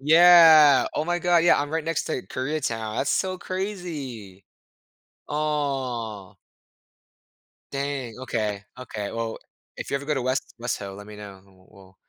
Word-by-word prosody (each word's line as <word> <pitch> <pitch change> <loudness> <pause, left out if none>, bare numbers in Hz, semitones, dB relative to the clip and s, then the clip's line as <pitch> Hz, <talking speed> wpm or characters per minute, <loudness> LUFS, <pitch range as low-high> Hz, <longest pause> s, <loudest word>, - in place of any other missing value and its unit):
Yeah. 160 -2 +7
Oh 150 - -1
my 175 +1 0
god, 175 -1 +3
yeah, 175 - +5
I'm 145 0 -3
right 160 -1 -2
next 165 -1 -1
to 125 - -3
Koreatown, 130 -5 -3
that's 140 - 0
so 185 -1 0
crazy. 155 - -6 0.8
Aw. 130 -9 -3 1.4
Dang, 140 -4 -3
okay, 105 -5 -3
okay. 110 -5 -6
Well, 115 -1 -4 0.4
if - - -7
you 140 - +1
ever 140 - -6
go 150 +1 0
to 135 - -2
West 130 +2 -2
West 120 0 -2
Ho, 100 -1 -7
let 105 +1 -11
me 105 - -11
know, 100 -2 -10
and 95 - -24 0.2
we'll 95 -2 -18
135 Hz, 155 wpm, -24 LUFS, 110-155 Hz, 1.4 s, Yeah